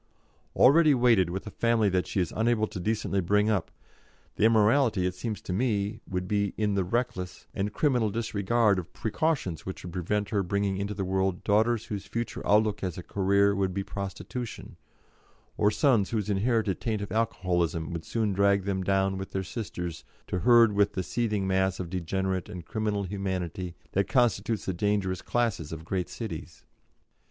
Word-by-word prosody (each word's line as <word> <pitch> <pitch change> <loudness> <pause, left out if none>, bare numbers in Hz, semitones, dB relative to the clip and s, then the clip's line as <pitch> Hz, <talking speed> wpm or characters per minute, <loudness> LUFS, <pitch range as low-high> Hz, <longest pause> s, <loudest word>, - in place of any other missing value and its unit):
Already 150 +2 +6
weighted 115 -8 +4
with 95 +2 -4
a 105 - -7
family 115 -1 +2
that 90 -2 +1
she - - -1
is 90 - -1
unable 110 -1 +2
to 100 - -7
decently 105 0 0
bring 105 +4 +2
up, 95 -6 0 0.7
the - - +2
immorality, 110 -2 +4
it 90 - 0
seems 105 +3 -5
to 90 - -4
me, 105 -1 0
would 90 -1 -2
be 100 0 0
in 105 -2 +1
the 100 -1 +1
reckless 90 -3 -3
and 100 +2 -2
criminal 125 -4 +1
disregard 110 -1 +1
of 90 - -8
precautions 110 - -1
which 95 - -7
would 90 -2 -7
prevent 100 +3 -1
her 100 - +2
bringing 100 +1 -1
into 100 +1 -3
the 95 -1 -2
world 95 -1 0
daughters 110 +2 +2
whose 100 -2 -5
future 115 -1 -4
outlook 105 0 +3
as 90 -3 -3
a 90 - -6
career 100 +2 +2
would 95 -2 -1
be 100 - -1
prostitution, 100 +5 -6 0.8
or 105 - +3
sons 110 -3 +2
whose 105 -2 -1
inherited 105 -1 +1
taint 110 -3 -1
of 100 - -7
alcoholism 90 -7 0
would 85 -1 -4
soon 110 -3 -1
drag 100 0 +3
them 95 -1 -1
down 95 0 +1
with 95 - -7
their 95 - -1
sisters 90 -5 -5 0.2
to 90 - -2
herd 115 +3 +6
with 100 0 +2
the 95 - -2
seething 105 +1 -1
mass 95 0 +1
of 85 -3 -5
degenerate 95 +1 -2
and 90 -3 -8
criminal 105 -2 -1
humanity 95 -2 -4 0.2
that 100 0 +1
constitutes 115 -4 +1
the 95 - -1
dangerous 95 -1 0
classes 115 -10 -1
of 80 0 -7
great 90 0 -2
cities. 80 -8 -7
100 Hz, 180 wpm, -28 LUFS, 95-110 Hz, 0.8 s, Already